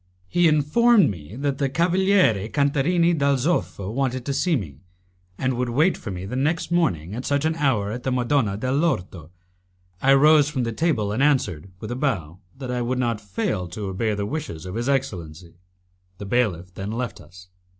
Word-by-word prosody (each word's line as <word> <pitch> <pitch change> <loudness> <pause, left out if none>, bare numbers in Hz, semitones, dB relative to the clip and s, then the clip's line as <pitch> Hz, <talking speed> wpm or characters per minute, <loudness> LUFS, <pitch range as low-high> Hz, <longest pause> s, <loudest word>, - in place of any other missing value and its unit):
He 175 - +3
informed 160 - +4
me 85 +2 -10
that 140 +1 -2
the 140 -2 +1
Cavaliere 170 - +2
Cantarini 150 +5 +2
dal 140 -3 +2
Zoffo 125 - -1
wished 130 -1 -1
to 140 - -1
see 170 +4 +1
me, 80 - -5 0.6
and 130 0 0
would 125 0 -2
wait 155 +10 +2
for - - -8
me 90 -1 -5
the 105 - -5
next 155 +6 -1
morning 105 - 0
at 125 +3 -5
such 140 +2 0
an 160 - +2
hour 120 -9 +1
at 120 +3 -5
the 130 - -2
Madonna 125 -4 +1
de 130 +4 -2
l'Orto. 95 - -1 0.7
I 135 +1 +5
rose 150 +1 +5
from 130 -4 -2
the 115 - -2
table 120 -9 0
and 110 +6 -1
answered, 110 - +1
with 110 - -6
a - - -2
bow, 95 - -2 0.2
that 130 -2 -5
I 125 -1 -1
would 125 +2 -1
not 120 -4 -1
fail 95 -2 -2
to 100 +3 -5
obey 105 +3 -1
the 100 0 -2
wishes 120 - -5
of 90 - -6
his 120 +5 -2
excellency. 90 - -3 0.6
The 100 - -7
bailiff 95 -6 -1
then 95 +2 -5
left 120 0 -4
us. 90 0 -15
125 Hz, 190 wpm, -23 LUFS, 100-145 Hz, 0.7 s, I